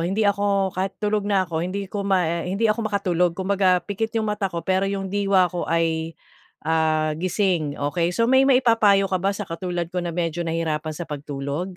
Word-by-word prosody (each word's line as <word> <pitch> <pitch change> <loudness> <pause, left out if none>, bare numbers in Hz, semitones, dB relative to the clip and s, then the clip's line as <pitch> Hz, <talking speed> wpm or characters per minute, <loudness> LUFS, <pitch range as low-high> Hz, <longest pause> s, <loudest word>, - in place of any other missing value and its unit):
Hindi 195 +6 0
ako 200 -1 +1
kahit 190 +1 -3
tulog 210 -1 -1
na 195 -2 +2
ako 165 -2 -3
hindi 190 +3 -3
ko 200 +1 -5
ma 180 -3 0
hindi 200 +5 -1
ako 215 0 +1
makatulog 180 -4 0
kumbaga 190 -1 +2
pikit 220 +3 -3
yung 220 - +1
mata 210 -2 -1
ko 170 -2 -5
pero 190 +1 +1
yung 195 -1 -4
diwa 195 -3 +2
ko 175 - -3
ay, 165 -1 0 0.5
ah, 155 -1 +1
gising, 175 -4 0
okey. 165 +4 0
So, 230 - +1
may 265 +3 +4
maipa-payo 225 -6 +4
ka 185 - 0
ba 195 +2 0
sa 205 - -4
katulad 175 0 -4
ko 180 - -1
na 170 -1 -4
medyo 170 -1 -1
nahihirapan 160 -1 -2
sa 175 - -4
pagtulog? 145 +4 -5
185 Hz, 195 wpm, -23 LUFS, 165-200 Hz, 0.5 s, may